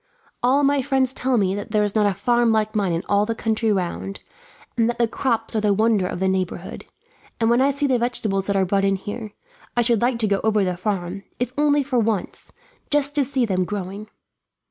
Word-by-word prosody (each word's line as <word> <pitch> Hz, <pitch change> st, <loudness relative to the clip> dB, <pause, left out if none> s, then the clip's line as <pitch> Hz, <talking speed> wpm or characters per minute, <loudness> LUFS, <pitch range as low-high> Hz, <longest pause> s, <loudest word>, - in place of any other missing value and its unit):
All 265 Hz, +4 st, +3 dB
my 280 Hz, 0 st, +3 dB
friends 265 Hz, -1 st, +1 dB
tell 260 Hz, -1 st, 0 dB
me 195 Hz, -3 st, +2 dB
that 205 Hz, +1 st, -5 dB
there 210 Hz, -1 st, +2 dB
is 205 Hz, -1 st, 0 dB
not 210 Hz, -2 st, +3 dB
a 200 Hz, -, 0 dB
farm 240 Hz, +3 st, +2 dB
like 215 Hz, -1 st, +1 dB
mine 200 Hz, -4 st, +1 dB
in 165 Hz, +2 st, -1 dB
all 205 Hz, 0 st, +3 dB
the 230 Hz, -, -1 dB
country 225 Hz, 0 st, 0 dB
round, 195 Hz, +1 st, -3 dB, 0.5 s
and 230 Hz, -1 st, +2 dB
that 240 Hz, -, -2 dB
the 235 Hz, -, +2 dB
crops 230 Hz, -1 st, -1 dB
are 215 Hz, -, +1 dB
the 205 Hz, -1 st, +2 dB
wonder 215 Hz, -3 st, +2 dB
of 175 Hz, -, -5 dB
the 190 Hz, -, +1 dB
neighbourhood; 190 Hz, -1 st, -3 dB, 0.5 s
and 225 Hz, 0 st, +2 dB
when 240 Hz, +2 st, +4 dB
I 275 Hz, -, +4 dB
see 280 Hz, +1 st, 0 dB
the 260 Hz, -3 st, +2 dB
vegetables 215 Hz, -5 st, -1 dB
that 200 Hz, -, 0 dB
are 190 Hz, -1 st, +3 dB
brought 195 Hz, +2 st, +1 dB
in 195 Hz, 0 st, +2 dB
here, 205 Hz, +2 st, -6 dB, 0.4 s
I 240 Hz, -, +4 dB
should 235 Hz, -2 st, +2 dB
like 245 Hz, 0 st, +1 dB
to 225 Hz, -2 st, 0 dB
go 200 Hz, -1 st, +1 dB
over 215 Hz, -2 st, +2 dB
the 180 Hz, -1 st, -1 dB
farm, 185 Hz, 0 st, -3 dB, 0.2 s
if 245 Hz, 0 st, -2 dB
only 290 Hz, -1 st, +3 dB
for 260 Hz, -2 st, 0 dB
once, 220 Hz, -4 st, -2 dB, 0.4 s
just 290 Hz, -1 st, +1 dB
to 290 Hz, -1 st, +3 dB
see 265 Hz, -2 st, 0 dB
them 185 Hz, -4 st, 0 dB
growing." 200 Hz, +2 st, -5 dB
220 Hz, 230 wpm, -22 LUFS, 195-245 Hz, 0.5 s, when